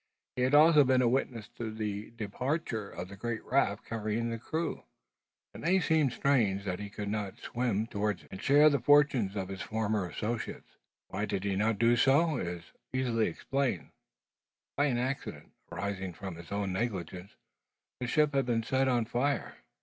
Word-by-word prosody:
He 125 - -2
had 130 +3 +3
also 155 0 +7
been 130 -1 +3
a - - +4
witness 120 -3 -1
to 120 -2 -6
the 105 -1 -4
departure 115 +1 -3
of 90 +2 -6
the 100 - -10
great 115 +2 -4
raft 120 -6 +1
carrying 115 +1 -2
the 115 - -4
crew. 160 +8 -3 0.7
It - - -9
may 180 +4 +3
appear 160 -5 +3
strange 115 -7 +1
that 90 -2 -2
he 105 0 -6
did 100 +1 -6
not 100 -2 -3
swim 115 -3 -1
towards 105 -2 -2
it, - - -20
and 95 - -7
share 145 +2 +6
the 140 - +2
fortunes 130 -6 +4
of 95 -2 -2
his 95 0 -6
former 110 -3 -1
associates. 110 +5 -4 0.4
Why 105 +3 -2
he 100 - -1
did 100 0 -1
not 110 0 +2
do 115 +3 +4
so 140 +5 +4
is 85 -4 -4 0.3
easily 120 -4 +1
explained. 135 - -2 0.8
By 145 - +2
an 130 -5 +1
accident, 130 +3 -4 0.2
arising 95 +1 -3
from 95 0 -7
his 85 +1 -12
own 100 -2 -1
negligence, 95 -3 -4 0.6
the 125 - -3
ship 150 +3 +2
had 135 -2 +1
been 115 -2 +1
set 135 +3 +1
on 120 -3 +2
fire. 125 +5 -1
115 Hz, 180 wpm, -31 LUFS, 100-130 Hz, 0.8 s, also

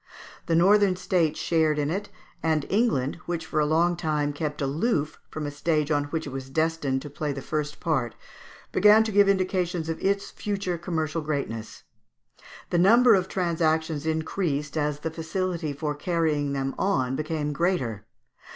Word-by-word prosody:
The 165 - +2
northern 195 +2 +5
states 175 -4 0
shared 160 -2 +2
in 145 0 0
it, 200 +4 -3 0.3
and 155 -2 +1
England, 195 - +1
which 170 -2 -3
for 155 - -1
a 150 - +2
long 170 +3 +2
time 150 -4 -1
kept 150 0 -4
aloof 150 - -1
from 155 -1 -5
a 145 - -3
stage 150 0 0
on 145 -1 +2
which 160 +2 -3
it 140 - -6
was 135 0 -6
destined 155 -3 0
to 145 - -7
play 150 0 -3
the 140 - -4
first 150 -1 -3
part, 130 -9 -1 0.6
began 210 +1 +6
to 220 - -3
give 200 0 +5
indications 185 -3 0
of 165 - -4
its 200 +1 0
future 195 -4 -3
commercial 165 -2 -2
greatness. 140 -7 -4 0.9
The 175 - +2
number 230 +6 +6
of 190 -2 +2
transactions 160 -4 0
increased 155 -2 -1
as 150 -1 -1
the 160 - -3
facility 165 0 -2
for 150 +1 -3
carrying 150 -2 0
them 135 -1 -2
on 130 -10 +1
became 155 0 -2
greater. 135 - -1
160 Hz, 165 wpm, -26 LUFS, 145-180 Hz, 0.9 s, began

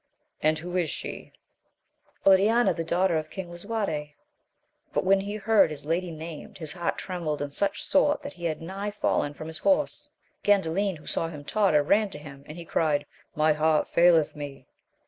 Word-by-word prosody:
And 155 +1 +3
who 175 +3 -6
is 170 -4 +1
she? - - -6 0.9
Oriana, 210 +5 +5
the 165 - -3
daughter 175 +1 +2
of 155 0 -7
King 180 -1 -7
Lisuarte. 175 -6 -3 0.8
But - - +1
when 195 +1 +4
he 200 +2 -4
heard 215 -3 +4
his 150 -2 -7
lady 170 +3 -1
named, 160 -1 -8
his 160 -5 -4
heart 175 -2 -2
trembled 170 -5 -3
in 145 0 -4
such 200 +6 -1
sort 290 +1 +2
that - - -6
he 175 -1 -8
had 160 -1 -2
nigh 195 +4 -4
fallen 150 -7 0
from 155 - -7
his 160 0 -4
horse. 290 -1 +1 0.3
Gandalin, 195 -1 +2
who 150 - -17
saw 165 - +1
him 150 -3 -8
totter, 185 -6 +3
ran 205 +7 +3
to 190 - -7
him, 140 -2 -11
and 155 - -9
he 170 - -8
cried. 150 -3 +1 0.3
My 155 0 +4
heart 155 0 +2
faileth 170 -3 +4
me 140 -3 -8
170 Hz, 185 wpm, -27 LUFS, 155-195 Hz, 0.9 s, Oriana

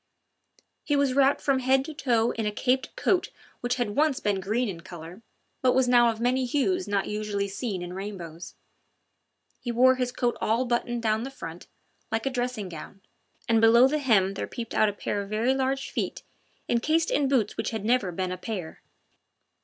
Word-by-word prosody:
He 290 - +1
was 280 -2 +2
wrapped 275 +1 +3
from 275 -2 +2
head 265 +1 +2
to 315 - -7
foot 240 -6 +1
in 220 - 0
a - - 0
caped 255 +4 0
coat 400 -6 +1 0.3
which 245 +1 -1
had 235 -5 -2
once 295 -2 +2
been 205 -2 0
green 220 +6 0
in 175 -5 -6
colour, 175 +2 -10 0.4
but 255 -1 +4
was 260 -1 +3
now 240 -1 +5
of 225 -1 -3
many 250 +2 +1
hues 300 +9 0
not 200 -1 0
usually 210 -1 -2
seen 200 -2 -4
in 175 0 -6
rainbows. 180 -4 -7 1.0
He 240 - -4
wore 255 +2 +5
his 250 -1 -1
coat 240 -1 0
all 230 +4 +1
buttoned 240 -1 -1
down 220 0 +1
the 260 - -4
front, 170 -10 -9 0.4
like 225 +2 -1
a 270 - 0
dressing 245 -5 -2
gown, 175 +3 -10 0.5
and 225 -2 +3
below 235 +3 +7
the 305 +3 0
hem 205 -8 +3
there - - -4
peeped 230 -2 -6
out 215 - +4
a - - -4
pair 205 0 -3
of 200 - -8
very 225 +5 +1
large 270 0 -1
feet - - -3 0.4
encased 310 +8 +1
in 285 -1 +2
boots 250 -6 +1
which - - -2
had 220 -3 -4
never 230 -5 +2
been 185 +1 -3
a 185 - -3
pair. 185 -7 -6
235 Hz, 195 wpm, -27 LUFS, 205-260 Hz, 1.0 s, below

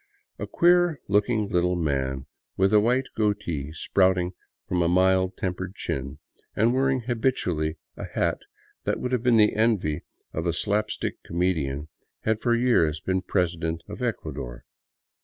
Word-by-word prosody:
A - - -4
queer 175 -2 +3
looking 105 +2 +2
little 90 -2 +2
man, 65 -5 -1 0.3
with 95 +2 +3
a 105 - +7
white 125 +5 +2
goatee 100 -9 -1
sprouting 90 +2 +2 0.4
from 90 -1 0
a 85 - +3
mild 95 +1 +3
tempered 95 +1 -3
chin, 70 -2 -4 0.4
and 115 +3 +3
wearing 135 0 +2
habitually 110 -10 -1 0.2
a - - -6
hat - - -1 0.5
that - - 0
would 125 - -3
have 125 -3 +1
been 120 -1 +4
the 105 -1 +5
envy 105 -9 +1 0.3
of 80 +2 -2
a 85 - +1
slap 105 +4 +1
stick - - -4
comedian, 80 -5 -1 0.3
had 110 0 0
for 120 -1 +2
years 100 -11 +2
been 95 +3 -1
president 85 -3 -1
of - - -8
Ecua - - -2
dor. - - -7
95 Hz, 155 wpm, -26 LUFS, 80-110 Hz, 0.5 s, a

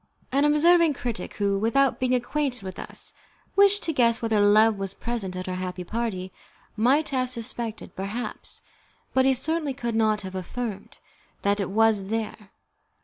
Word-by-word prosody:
An 280 +2 +3
observing 320 +1 +5
critic 235 -7 -5
who, 200 -1 0
without 265 +6 +2
being 255 0 +2
acquainted 250 -1 -1
with 185 -1 -7
us, - - -7 0.4
wished 400 0 +5
to 325 - -1
guess 235 -4 +3
whether 225 -2 +1
love 210 +1 +5
was 195 0 -4
present 225 -6 -4
at 185 0 -5
our 185 - -2
happy 185 0 -4
party, 190 -3 -3 0.4
might 260 +8 +3
have 255 -2 0
suspected, 235 -2 -4
perhaps, 205 +6 -5 0.5
but 260 0 +4
he 265 - +5
certainly 300 +1 -1
could 235 -2 -3
not 215 -2 +2
have 190 0 -7
affirmed, 200 +2 -5 0.5
that 200 +1 +2
it 195 - -1
was 215 -1 +3
there. 215 -1 -4
225 Hz, 160 wpm, -25 LUFS, 200-260 Hz, 0.5 s, observing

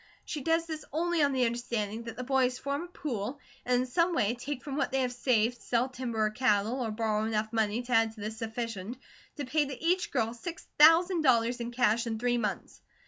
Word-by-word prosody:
She 300 - -4
does 330 +3 +1
this 315 -2 -6
only 340 +2 0
on 285 -1 +4
the 260 -2 +2
understanding 230 -2 -2
that 230 - -7
the 250 - -4
boys 255 -1 +1
form 280 +5 -3
a - - -11
pool, 265 - -4 0.2
and 250 0 +2
in - - -1
some 335 +7 +1
way 210 -4 +2
take 255 +2 -5
from 280 -2 -5
what 290 - 0
they 265 0 +1
have 250 -1 -1
saved, 245 -1 +1
sell 245 +2 0
timber 240 -4 -2
or 215 - 0
cattle, 220 +1 +1
or 230 - -1
borrow 215 -1 0
enough 220 0 -1
money 220 +1 0
to 245 - -9
add 225 -2 +3
to 220 - -15
this 215 +2 -5
sufficient 225 -1 -4 0.4
to 290 - -3
pay 295 +3 +1
to 270 -3 -7
each 360 +3 +1
girl 230 -4 0
six 340 +8 -7
thousand 330 +3 +7
dollars 240 -3 +3
in 235 0 -3
cash, 235 -1 +1
in 225 -1 -2
three 245 +1 +1
months. 210 -3 -4
245 Hz, 225 wpm, -30 LUFS, 225-280 Hz, 0.4 s, thousand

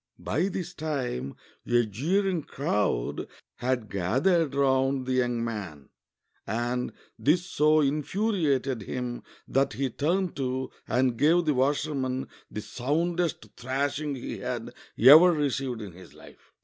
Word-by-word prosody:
By 185 - -1
this 185 -3 -4
time 125 - -3 0.3
a 120 0 +3
jeering 175 - 0
crowd 105 - -1 0.3
had 125 -2 -1
gathered 135 - +1
round 135 -1 +2
the 130 - -1
young 120 -2 +1
man, 95 -12 -6 0.6
and 120 +3 -1 0.3
this 170 +5 +2
so 155 -2 +3
infuriated 145 - 0
him 125 +3 -4 0.3
that 135 -1 +1
he 130 +3 -2
turned 175 +8 0
to 130 -1 -2 0.2
and 125 -2 +1
gave 165 +6 +4
the 150 - +3
washerman 135 -1 0 0.2
the 105 - -5
soundest 165 +5 -1
thrashing 140 +3 -2
he 125 - -6
had - - -4 0.2
ever 155 +8 +9
received 135 -6 -1
in 100 - -8
his 85 -4 -15
life. 75 - -17
135 Hz, 125 wpm, -27 LUFS, 120-155 Hz, 0.6 s, ever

